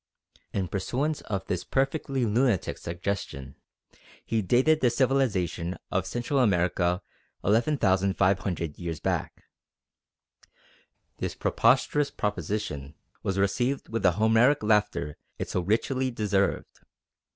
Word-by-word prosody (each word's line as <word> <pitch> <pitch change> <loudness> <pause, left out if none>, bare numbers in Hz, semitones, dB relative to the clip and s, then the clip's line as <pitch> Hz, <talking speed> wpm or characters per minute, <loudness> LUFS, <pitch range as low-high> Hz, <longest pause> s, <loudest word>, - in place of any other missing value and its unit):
In 95 -2 -1
pursuance 135 - -2
of 100 -2 -2
this 90 -1 -2
perfectly 135 -1 0
lunatic 115 -2 +1
suggestion, 85 -7 -4 0.7
he 115 -1 0
dated 130 - +3
the 125 - +4
civilisation 115 - 0
of - - 0
Central 120 +3 -1
America 90 -4 +2 0.4
11,500 95 - +1
years 85 -4 -4
back. - - -2 1.7
This - - -3
preposterous 135 +4 +2
proposition 90 -7 -3 0.3
was 95 0 -2
received 120 +8 0
with 115 0 -2
the 90 -3 +4
Homeric 110 - +4
laughter 105 -9 +1 0.2
it - - -4
so - - 0
richly 130 +7 0
deserved. 105 -4 -1
105 Hz, 105 wpm, -27 LUFS, 90-125 Hz, 1.7 s, the